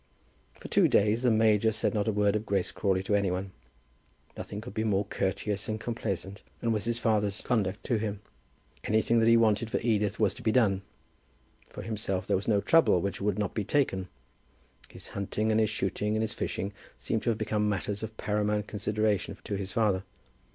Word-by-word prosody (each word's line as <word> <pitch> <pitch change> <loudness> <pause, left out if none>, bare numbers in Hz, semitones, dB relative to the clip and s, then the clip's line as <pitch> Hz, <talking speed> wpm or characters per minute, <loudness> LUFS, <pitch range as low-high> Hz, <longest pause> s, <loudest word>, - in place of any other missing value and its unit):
For - - -8
two - - +4
days 105 +3 +3
the 125 - +3
major 110 -1 +4
said 110 - -1
not 105 -1 0
a - - +3
word 105 0 +2
of 105 - -1
Grace 100 -4 -1
Crawley 95 -2 0
to 100 - -1
any 100 -2 +2
one. 95 +1 -3 0.8
Nothing 100 - -6
could 120 +3 -8
be 110 - -1
more 100 -2 +1
courteous 100 +1 -2
and 110 0 -2
complaisant 100 -5 -4 0.2
than 115 - 0
was 105 -1 0
his 120 0 0
father's 105 -4 +1
conduct 105 -4 -1
to 120 - 0
him. 105 -2 -3 0.6
Anything 110 +2 +2
that 115 - +3
he 115 - +7
wanted 110 0 +2
for - - 0
Edith 105 -2 +1
was 105 -3 +3
to - - -11
be 110 - +1
done. 105 -6 +3 0.9
For - - -8
himself 100 -4 -2
there - - +1
was 95 - -3
no 105 -3 +3
trouble 165 - +4
which 100 +3 -3
would 100 -1 0
not 105 -3 -1
be 105 - -1
taken. 95 -6 0 0.8
His - - -9
hunting, 105 +2 -1
and 110 - +3
his 110 -1 +3
shooting, 105 0 -1
and 110 - +1
his 110 +1 -3
fishing 100 -3 -3 0.2
seemed 110 - -2
to - - -1
have 115 - +1
become 105 -1 0
matters 105 0 -2
of 110 0 -6
paramount 105 0 0
consideration 105 0 -1
to - - -5
his 100 -1 -3
father. 100 -4 +1
105 Hz, 200 wpm, -29 LUFS, 100-110 Hz, 0.9 s, he